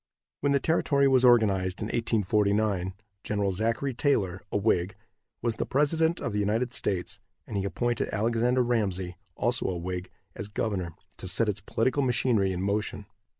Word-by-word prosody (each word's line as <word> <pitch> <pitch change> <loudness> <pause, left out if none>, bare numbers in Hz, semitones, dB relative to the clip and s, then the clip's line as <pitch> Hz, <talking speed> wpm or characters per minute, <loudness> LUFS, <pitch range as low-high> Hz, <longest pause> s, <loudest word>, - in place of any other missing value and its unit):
When 145 - +1
the 140 - +3
territory 140 -3 +2
was 130 -2 +4
organized 100 -7 +4
in 105 - -3
1849, 105 -4 +1 0.3
Gen. 100 -2 0
Zachary 115 +7 -1
Taylor, 105 - 0
a - - +1
Whig, 100 -1 +1 0.5
was 115 -2 0
the - - -1
president 160 +4 +2
of 120 - -3
the 105 - 0
United 110 +4 0
States, 95 -1 -2 0.3
and 110 - -7
he 100 -1 0
appointed 120 +3 -1
Alexander 120 +4 +2
Ramsey, 95 -7 -1 0.2
also 120 +2 0
a 90 - -2
Whig, 90 +1 -4 0.3
as 100 - -5
governor, 100 -5 -3 0.2
to 95 - -7
set 105 +5 +2
its 105 0 -2
political 130 +5 0
machinery 120 -6 +2
in 90 0 -3
motion. 100 0 -2
105 Hz, 160 wpm, -28 LUFS, 95-120 Hz, 0.5 s, was